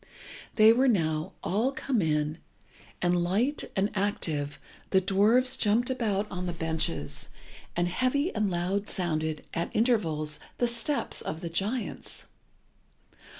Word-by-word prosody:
They 220 0 +8
were 260 +3 +3
now 160 -8 +1
all 220 +8 +1
come 265 -4 -1
in, 155 0 0 0.6
and, 175 0 +2
light 225 +12 +1
and 200 +1 +1
active, 165 -8 -1 0.3
the 190 - +4
dwarfs 215 +7 +3
jumped 235 +2 +2
about 215 -5 0
on 180 0 -3
the 175 - -2
benches, 120 - -2 0.5
and 175 0 +1
heavy 255 - 0
and 210 -2 +1
loud 185 +4 -1
sounded, 155 -4 -1
at 170 - -2
intervals, 165 -11 +1 0.2
the 245 - +2
steps 235 +5 +2
of 160 +1 -5
the 170 - -4
giants. 205 +9 -2
195 Hz, 130 wpm, -28 LUFS, 165-230 Hz, 0.6 s, They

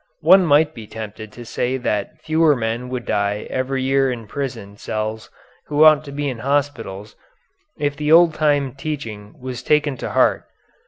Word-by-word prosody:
One 180 +3 +6
might 150 +1 +4
be 110 -5 -10
tempted 110 0 -8
to 120 - -10
say 125 +2 -2
that 105 -5 -3
fewer 155 -1 +3
men 120 +1 -3
would 125 -2 -4
die 100 +1 -1
every 130 0 -1
year 135 0 +2
in 115 -2 -6
prison 105 -4 -6
cells 110 +1 -4 0.4
who 150 +1 +3
ought 155 -1 +6
to 140 - -8
be 145 +1 -3
in 125 -4 -4
hospitals, 120 -7 -2 0.6
if 145 -1 -1
the 150 +1 -1
old 165 0 +7
time 145 -4 +1
teaching 115 -8 -6
was 130 -1 -6
taken 150 -3 +1
to - - -5
heart. - - +2
130 Hz, 170 wpm, -20 LUFS, 110-145 Hz, 0.6 s, old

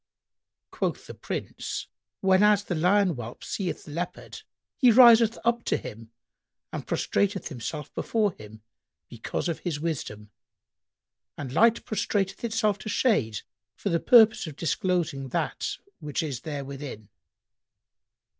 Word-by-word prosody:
Quoth - - -2
the - - -9
Prince, - - -5 0.4
"Whenas 200 +2 +4
the 185 - -3
lion 185 +4 +3
whelp 120 -7 -6
seeth 190 -4 -3
the - - -10
leopard,[FN#99] 170 +3 -5 0.4
he 250 -4 +6
riseth 230 -1 +7
up 235 0 +2
to - - +1
him 115 +1 -9 0.6
and - - -5
prostrateth 200 -1 0
himself 150 +2 -6
before 215 -3 0
him, 110 -5 -13 0.5
because - - -4
of 170 - -2
his 165 -5 -3
wisdom, 110 -10 -4 1.1
and 130 -3 -6
Light 230 +5 +4
prostrateth 200 -1 -1
itself 220 -3 0
to - - -6
shade 130 - +1 0.3
for 200 - -3
the 170 -2 +1
purpose 220 -4 +6
of 155 - -8
disclosing 165 -3 -1
that 125 - -2 0.2
which 150 +2 -3
is 135 -6 -4
therewithin." 140 -6 -6
175 Hz, 125 wpm, -27 LUFS, 140-210 Hz, 1.1 s, riseth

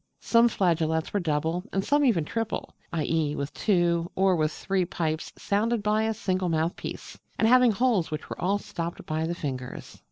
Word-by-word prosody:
Some 235 0 +4
flageolets 160 -5 0
were 205 - +2
double, 160 +1 -1
and 195 0 -1
some 290 0 +3
even 205 - +3
triple, 225 +5 -3 0.2
i.e., 160 -2 0
with 140 +1 -4
two, 175 -4 +1
or 190 -1 +3
with 155 -2 +1
three, 190 +2 -1
pipes, 160 -2 -2
sounded 220 +2 0
by 215 +1 +2
a 225 - 0
single 185 -3 -1
mouthpiece, 160 +1 -3 0.2
and 220 - +3
having 250 0 +6
holes 220 -5 +1
which 155 -1 -5
were - - -7
all 195 +3 +2
stopped 170 -4 -6
by 155 +1 -1
the 170 - -2
fingers. 130 -5 -6
175 Hz, 180 wpm, -27 LUFS, 160-210 Hz, 0.2 s, having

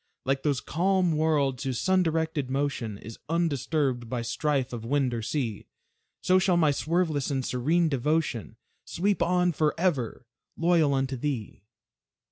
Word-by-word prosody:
Like 135 +1 0
those 140 -3 0
calm 185 +2 +1
worlds 145 -5 +1
whose 130 -3 -2
sun 190 0 +3
directed 160 -4 -1
motion 135 -6 -2
Is 110 +2 -10
undisturbed 140 -6 0
by 120 -1 -2
strife 135 +2 -1
of 115 -2 -5
wind 130 +1 0
or 115 - -2
sea, 115 -3 -3 0.6
So 185 0 +4
shall 185 -2 +2
my 155 -3 +4
swerveless 155 -1 0
and 135 -3 -1
serene 160 +7 +1
devotion 145 -4 -1 0.3
Sweep 200 +3 -1
on 180 0 +2
forever, 150 -6 0 0.3
loyal 165 -4 +3
unto 135 0 -1
thee. 120 -7 -4
145 Hz, 140 wpm, -27 LUFS, 130-165 Hz, 0.6 s, So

